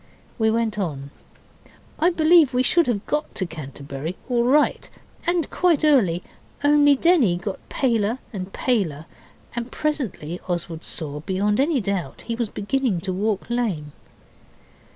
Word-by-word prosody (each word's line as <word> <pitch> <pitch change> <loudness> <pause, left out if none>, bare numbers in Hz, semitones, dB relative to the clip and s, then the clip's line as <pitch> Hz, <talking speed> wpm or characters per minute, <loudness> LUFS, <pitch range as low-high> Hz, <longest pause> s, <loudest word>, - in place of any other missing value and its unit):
We 220 0 +3
went 220 -1 0
on. 140 -7 -4 0.9
I 335 - +4
believe 320 -5 +5
we 250 - +3
should 340 +4 +3
have 220 -4 -1
got 300 +1 -2
to 190 - -1
Canterbury 145 0 -6
all 240 -2 +2
right 290 +4 +2 0.4
and 345 -3 +2
quite 340 -5 +2
early, 195 - +3 0.4
only 290 -1 +5
Denny 270 - +3
got 190 +2 -5
paler 230 -3 +1 0.2
and 190 -1 -5
paler, 180 - -1 0.5
and 240 0 -4
presently 230 - -3
Oswald 170 -2 -3
saw, 150 -3 -3
beyond 195 +6 0
any 285 0 +2
doubt, 195 - -2
that - - -13
he 230 - 0
was 235 -2 -2
beginning 230 -2 -1
to 185 +1 -3
walk 205 +2 -1
lame. 210 -12 -2
220 Hz, 145 wpm, -23 LUFS, 175-270 Hz, 0.9 s, believe